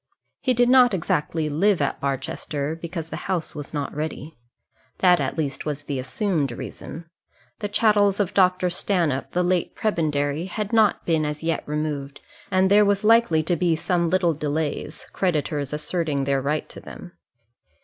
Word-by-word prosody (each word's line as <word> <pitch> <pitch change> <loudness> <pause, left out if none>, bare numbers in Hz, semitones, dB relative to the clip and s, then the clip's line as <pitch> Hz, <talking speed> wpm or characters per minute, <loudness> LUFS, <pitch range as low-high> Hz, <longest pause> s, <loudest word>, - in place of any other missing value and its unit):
He 255 -2 +1
did 245 +1 +4
not 250 -4 +6
exactly 160 -2 -1
live 185 +6 +2
at 145 - -1
Barchester, 140 +2 -3
because 165 0 -6
the - - -5
house 180 -4 -1
was 145 -2 -7
not 145 -2 -3
ready. 155 +1 -5 0.6
That 180 -2 +5
at 135 +2 -2
least 145 -4 -2
was 145 -1 -4
the 140 -2 -3
assumed 145 - -1
reason. 160 +6 -8 0.5
The 205 - -3
chattels 205 -2 +3
of 205 -1 0
Dr. 185 -2 +3
Stanhope, 170 -7 0
the 180 - +2
late 180 -1 0
prebendary, 155 -6 0
had 210 +3 -4
not 220 -3 +3
been 160 -2 +2
as 150 +1 -4
yet 165 0 0
removed, 150 -2 -3 0.3
and 190 +1 +2
there 210 +1 +7
was 200 0 +1
likely 220 -8 +4
to 175 +2 0
be 170 0 +2
some 170 +1 0
little 180 -2 +2
delay, 150 0 -2 0.2
creditors 150 -6 -1
asserting 150 -1 -1
their 135 0 +1
right 150 +3 -1
to - - -9
them. 180 - -11
165 Hz, 165 wpm, -24 LUFS, 150-190 Hz, 0.6 s, there